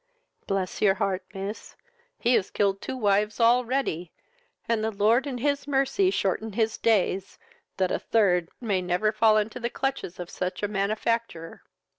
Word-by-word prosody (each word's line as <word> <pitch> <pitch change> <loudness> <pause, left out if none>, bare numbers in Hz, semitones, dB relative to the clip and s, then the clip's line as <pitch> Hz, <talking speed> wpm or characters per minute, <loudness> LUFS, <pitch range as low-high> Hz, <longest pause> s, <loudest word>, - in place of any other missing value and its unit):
"Bless 195 -2 -2
your 195 -2 +4
heart, 195 -2 -1
miss, 200 +2 -7 0.4
he 240 - +2
has 195 - +2
killed 195 -1 0
two 260 - -5
wives 210 -1 +1
already, 235 -7 +2 0.6
and 230 -2 +1
the 220 - +1
Lord 220 +6 +2
in 260 -3 -3
his 285 +2 -1
mercy 275 +7 +2
shorten 215 - -1
his 220 +1 0
days, 195 -3 +1 0.4
that 185 -1 +1
a - - 0
third 180 -6 +2
my 210 -6 0
never 180 +4 +1
fall 215 0 +4
into 215 +3 -1
the 235 0 -2
clutches 270 -10 -3
of 175 -1 -6
such 180 +2 -4
a - - +2
manufactor! 210 -3 -2
215 Hz, 160 wpm, -26 LUFS, 195-235 Hz, 0.6 s, your